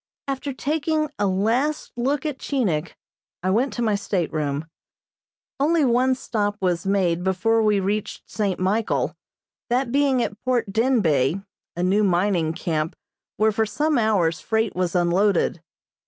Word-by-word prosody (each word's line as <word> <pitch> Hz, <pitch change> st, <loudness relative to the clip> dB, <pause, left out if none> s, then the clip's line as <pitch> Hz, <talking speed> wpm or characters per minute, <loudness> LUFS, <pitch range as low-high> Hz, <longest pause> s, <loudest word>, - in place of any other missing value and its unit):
After 275 Hz, +1 st, -3 dB
taking 305 Hz, +3 st, -1 dB
a 205 Hz, -, +2 dB
last 230 Hz, +11 st, 0 dB
look 270 Hz, +5 st, -1 dB
at 295 Hz, -3 st, -3 dB
Chinik, 180 Hz, -, -1 dB, 0.5 s
I 185 Hz, -, +1 dB
went 245 Hz, +7 st, +2 dB
to 240 Hz, -, -2 dB
my 220 Hz, -2 st, +2 dB
stateroom. 155 Hz, -7 st, -1 dB, 0.9 s
Only 310 Hz, +1 st, +3 dB
one 255 Hz, +1 st, +3 dB
stop 205 Hz, -5 st, -2 dB
was 180 Hz, -1 st, -1 dB
made 180 Hz, -3 st, +1 dB
before 210 Hz, +5 st, +2 dB
we 210 Hz, -2 st, +3 dB
reached 200 Hz, +2 st, -3 dB
St. 200 Hz, -4 st, -2 dB
Michael, 200 Hz, +4 st, 0 dB, 0.5 s
that 245 Hz, 0 st, +1 dB
being 270 Hz, -2 st, +2 dB
at 205 Hz, -, -6 dB
Port 240 Hz, -5 st, 0 dB
Denbeigh, 195 Hz, -, +2 dB, 0.3 s
a 175 Hz, -, -2 dB
new 195 Hz, +4 st, +3 dB
mining 175 Hz, -3 st, +1 dB
camp 160 Hz, -2 st, -2 dB, 0.4 s
where 220 Hz, 0 st, +3 dB
for 220 Hz, +1 st, 0 dB
some 300 Hz, +3 st, +1 dB
hours 195 Hz, -8 st, +2 dB
freight 220 Hz, -1 st, -1 dB
was 180 Hz, -1 st, -1 dB
unloaded. 180 Hz, 0 st, +2 dB
210 Hz, 140 wpm, -23 LUFS, 180-255 Hz, 0.9 s, Only